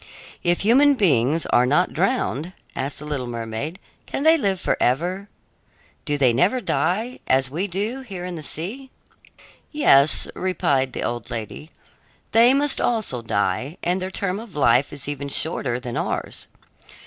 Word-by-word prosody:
"If 175 0 +1
human 275 +7 +5
beings 155 - +2
are 125 +1 +5
not 170 +7 +2
drowned," 180 - -1 0.2
asked 135 +2 -3
the 150 - -7
little 140 -4 -3
mermaid, 115 +7 -5 0.3
"can 275 - -3
they 320 +1 +6
live 200 - 0
forever? 180 +12 0 0.8
Do 145 -1 -1
they 130 -4 +3
never 185 - +2
die, 230 +2 -1
as 130 0 +2
we 175 +7 -2
do 205 +8 -3
here 195 -8 -7
in 180 - -5
the 160 - -6
sea?" 205 - -5 0.8
"Yes," 150 - +5
replied 140 -8 0
the - - -4
old 120 -1 -4
lady, 115 +7 -6 0.6
"they 235 +2 +6
must 285 +1 +2
also 220 - -1
die, 110 - -1
and 180 +2 0
their 185 - -3
term 190 0 -2
of 220 -6 -11
life 135 -1 +3
is 140 -1 -9
even 140 -1 -4
shorter 135 -5 0
than 125 -2 -6
ours. - - -3
165 Hz, 155 wpm, -22 LUFS, 130-200 Hz, 0.8 s, they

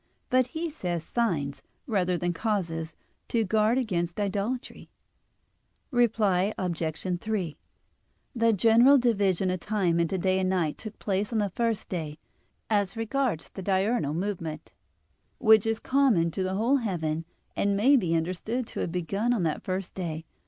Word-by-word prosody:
But 255 -1 +4
he 335 +3 -3
says 175 - -3
"signs," 160 -12 -1 0.2
rather 185 -6 +1
than 175 0 -1
"causes," 165 -5 -2 0.3
to 230 -1 +1
guard 215 +3 +2
against 175 -7 -1
idolatry. 205 +5 -3 1.0
Reply 215 -5 +2
Obj. 175 0 -2
3: 195 -8 -2 0.8
The 230 -1 +3
general 230 +6 +6
division 200 -7 +2
of 185 - -2
time 185 -4 0
into 170 +3 +1
day 185 +1 +1
and 185 0 +1
night 175 -5 0
took 215 -1 -8
place 200 +1 -1
on 230 - 0
the 205 -2 0
first 230 0 -1
day, 155 -5 -4 0.5
as 205 -2 0
regards 225 - -1
the 195 - -8
diurnal 190 -4 +1
movement, 170 -4 -4 0.7
which 220 -3 +5
is 225 0 0
common 250 -12 +2
to 190 - -3
the 185 0 -1
whole 235 +7 +3
heaven 165 - -2 0.3
and 200 0 +1
may 260 +8 +5
be 175 -10 +2
understood 185 +9 -2
to - - -7
have 170 - -2
begun 195 +7 -1
on 215 -7 0
that 155 -2 -1
first 185 0 -4
day. 165 -3 -4
195 Hz, 150 wpm, -27 LUFS, 175-225 Hz, 1.0 s, general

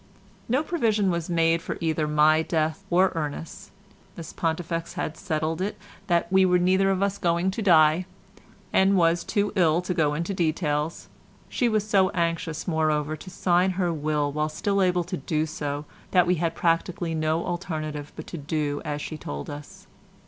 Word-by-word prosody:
No 260 +6 +2
provision 220 - +1
was 170 -1 -3
made 165 -1 +2
for - - -5
either 160 -2 0
my 150 +1 +4
death 160 +3 -1
or 185 +2 +4
Ernest's—Miss 170 +2 -8
Pontifex 165 0 -2
had 155 - -3
settled 155 +2 -2
it 205 +2 -2 0.3
that 170 -2 +2
we 190 0 +6
were 180 -1 +4
neither 190 +2 +3
of 195 0 +1
us 200 0 -1
going 170 +2 +1
to 210 - -4
die, 165 -2 +4 0.7
and 190 +1 +4
was 170 0 +3
too 205 0 -1
ill 170 -3 +3
to 180 - -2
go 150 -3 +1
into 170 +5 -2
details; 155 -3 -1 0.4
she 245 - +1
was 215 -1 0
so 195 -3 +4
anxious, 165 -2 -2
moreover, 155 -2 0
to 185 - -11
sign 180 0 +2
her 175 -3 +1
will 150 -1 -1
while 150 +1 -1
still 200 +6 0
able 180 -1 +2
to 180 +2 -4
do 155 -1 -1
so 150 -2 -4 0.2
that 180 -2 +4
we 180 - +2
had 165 -1 0
practically 170 0 0
no 160 +1 0
alternative 155 -5 -4
but 155 - -8
to 170 - -7
do 145 0 -2
as 150 -2 -4
she 155 - -6
told 70 - -6
us. 145 0 -10
165 Hz, 175 wpm, -25 LUFS, 155-185 Hz, 0.7 s, we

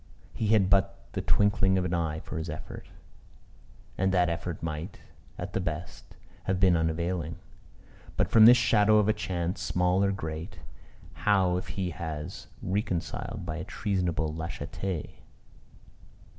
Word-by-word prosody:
He 110 - -2
had 105 -3 +4
but 95 0 +2 0.2
the - - -2
twinkling 95 -2 +3
of 90 - 0
an 90 - -1
eye 80 -2 -1
for 80 - -5
his 80 +1 -5
effort, 75 0 -7 1.1
and 95 +1 +2
that 90 -2 +3
effort 85 0 -4
might, 80 +1 -4 0.4
at - - -6
the - - 0
best, 85 -1 -5 0.3
have 95 -1 0
been 90 -2 +5
unavailing; 80 0 -1 0.8
but - - +2
from 110 -1 +9
this 120 +1 +9
shadow 110 -3 +4
of 105 -1 +4
a 110 - +4
chance, 90 -5 -3
small 90 +2 +2
or 100 - +2
great, 80 -1 -5 0.6
how 95 -4 +2
if 90 - -5
he 95 -2 -3
has 80 -3 -6 0.2
recoiled 95 +1 -2
by 80 -1 -4
a 85 - -4
treasonable 90 -6 -1
lâcheté? 85 +1 -5
90 Hz, 145 wpm, -28 LUFS, 80-100 Hz, 1.1 s, from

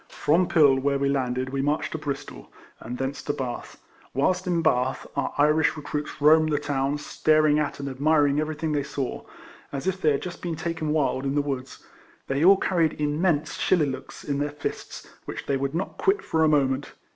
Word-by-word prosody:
From 170 +4 +2
Pill, 140 -5 +5
where 140 +1 +1
we 140 0 0
landed, 130 -1 -1
we 135 0 -1
marched 145 +2 0
to 160 - -4
Bristol, 140 - -6 0.3
and 120 +2 -6
thence 135 +2 -3
to 145 - -2
Bath. 125 -3 -6 0.4
Whilst 185 +7 +1
in 170 -2 +1
Bath, 130 -4 +1
our - - -1
Irish 150 +2 +3
recruits 150 0 -5
roamed 155 +2 +5
about 150 -2 +1
the - - -10
town, 140 0 0
staring 155 0 +2
at 150 -1 -2
and 140 - -4
admiring 145 +1 +2
everything 155 +1 -2
they 145 -1 +1
saw, 140 -2 -4 0.5
as 140 +2 -5
if 190 0 -1
they 155 - +4
had 140 - -2
just 180 -1 -7
been 170 -2 -3
taken 165 -1 -3
wild 145 -3 +1
in 135 0 -1
the 145 - +3
woods. 135 -2 -5 0.4
They 135 +3 -1
all 195 +3 +7
carried 170 -6 0
im 150 +1 -1
mense 160 -5 0
shillelaghs 150 -7 0
in 140 -1 -2
their 145 +1 0
fists, 145 0 -6 0.2
which - - -6
they 140 - 0
would 135 +2 -2
not 185 - -4
quit 410 +3 +2
for 160 - +1
a - - +5
moment. 135 -2 +1
145 Hz, 205 wpm, -25 LUFS, 140-160 Hz, 0.5 s, all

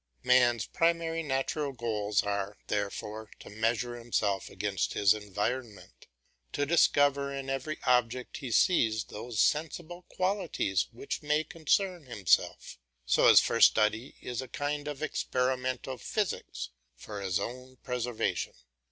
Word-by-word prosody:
Man's 120 -4 +4
primary 165 0 +1
natural 140 0 -1
goals 105 -4 0
are, 100 0 -2
therefore, 105 +1 -3
to - - -12
measure 115 +3 0
himself 105 -4 -1
against 95 -2 -2
his 100 0 +5
environment, 105 +2 -4 0.5
to 145 - 0
discover 145 -3 +3
in 135 -1 -4
every 135 +3 -3
object 125 -1 +1
he 135 -4 -6
sees 115 - +3
those 110 +1 -6
sensible 165 +3 0
qualities 185 - 0
which 120 +4 -5
may 150 +1 +1
concern 165 0 0
himself, 100 - +1 0.3
so 65 - +4
his - - +9
first - - +6
study 110 +4 0
is 125 0 -4
a 130 - -7
kind 145 +3 -3
of 150 0 -5
experimental 130 -2 -1
physics 210 - -3 0.3
for 100 +9 -8
his 95 0 0
own 125 +4 -6
preservation. 125 -2 -2
125 Hz, 125 wpm, -30 LUFS, 105-145 Hz, 0.5 s, his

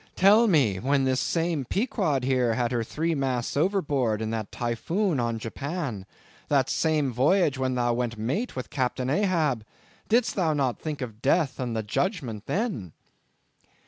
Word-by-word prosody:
Tell 210 +5 +6
me, 130 - +3
when 135 +5 +1
this 130 0 +1
same 165 -3 0
Pequod 185 - 0
here 125 -3 +2
had 120 0 0
her 120 -2 0
three 165 +8 -1
masts 130 -5 -1
overboard 145 - +1
in 110 0 -3
that 110 -2 -4
typhoon 155 - -1
on 115 -1 -1
Japan, 125 - -4 0.4
that 135 -3 +2
same 155 -5 +1
voyage 145 - +2
when 130 -1 0
thou 120 -1 +1
went 120 -1 -2
mate 135 - -2
with 130 - -6
Captain 130 -1 -1
Ahab, 155 - +1 0.5
did'st 230 0 +3
thou 165 -5 +1
not 135 -4 0
think 155 -3 -5
of 115 -3 -6
Death 145 +1 +1
and 120 -3 -2
the 110 - -1
Judgment 125 - -2
then?" 155 - -2
135 Hz, 160 wpm, -26 LUFS, 120-165 Hz, 0.5 s, Tell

